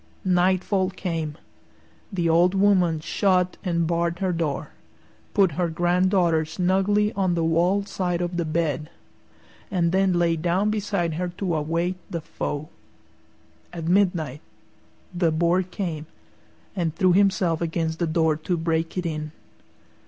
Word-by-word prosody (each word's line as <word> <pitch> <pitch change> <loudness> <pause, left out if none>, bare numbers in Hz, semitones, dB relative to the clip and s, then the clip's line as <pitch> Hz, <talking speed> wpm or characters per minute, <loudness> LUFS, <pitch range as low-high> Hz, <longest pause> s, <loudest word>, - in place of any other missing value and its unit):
Nightfall 185 +1 +2
came. 165 -5 -4 0.7
The 175 -4 0
old 175 +3 +4
woman 185 -5 +3
shut 180 +1 +1
and 170 -3 0
barred 170 +1 0
her 185 -1 -1
door, 160 -5 -2 0.6
put 195 -4 +4
her 170 +3 -1
granddaughter 175 0 +2
snugly 190 +6 +1
on 190 -3 +1
the 165 - 0
wall 175 +5 +2
side 180 -3 -2
of 175 0 -2
the 170 - +1
bed, 155 -2 -1 0.8
and 175 -3 +1
then 190 0 +2
lay 170 -1 +2
down 180 +6 +1
beside 200 -6 -1
her 180 +3 -2
to 185 -4 -1
await 165 +4 -1
the 170 - -4
foe. 155 -2 -5 1.0
At 170 -2 -6
midnight 175 -7 +1 0.7
the 175 -2 +2
Boar 170 +3 +2
came 175 -4 -5 0.7
and 170 -4 -1
threw 185 -2 +3
himself 185 -4 +2
against 165 -1 -2
the 170 - 0
door 160 -1 +2
to 175 +3 -2
break 165 +1 -1
it 180 - -2
in. 155 -2 -3
175 Hz, 140 wpm, -24 LUFS, 165-185 Hz, 1.0 s, old